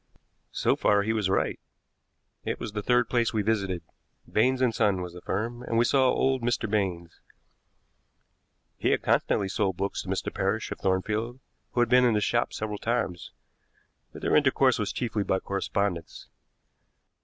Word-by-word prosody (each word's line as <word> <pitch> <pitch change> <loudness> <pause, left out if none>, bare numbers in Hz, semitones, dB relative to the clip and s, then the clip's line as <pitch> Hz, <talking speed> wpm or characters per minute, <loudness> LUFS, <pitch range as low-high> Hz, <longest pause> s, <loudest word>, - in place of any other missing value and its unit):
So - - +2
far 100 -1 +3
he 110 +2 0
was 105 -4 0
right. 95 - 0 0.8
It - - -3
was 115 - -5
the 105 0 -3
third 125 +3 +2
place 120 -2 +1
we 105 - +1
visited. 100 -5 -1 0.4
Baines 130 +4 +2
and 125 -3 +2
Son 100 -5 +1
was 90 -1 -7
the 90 - -10
firm, 115 +7 -3
and 115 -2 -2
we 120 - +4
saw 130 +1 +4
old 130 0 +1
Mr. 115 -1 0
Baines. 95 -5 -2 1.6
He - - +1
had - - +1
constantly 100 - +2
sold 95 -2 -1
books 100 +1 -2
to - - -12
Mr. - - -2
Parrish, - - -1
of - - -5
Thornfield, 110 +6 -1 0.3
who 120 - +2
had 120 - +2
been 125 +1 +6
to 120 -2 +4
his 105 - +1
shop 120 0 +1
several 105 -1 -4
times, 100 -7 -2 0.8
but - - -11
their - - +2
intercourse - - +3
was - - -1
chiefly 110 -4 -2
by 95 - +1
correspondence. 100 -2 -3
110 Hz, 170 wpm, -27 LUFS, 95-120 Hz, 1.6 s, been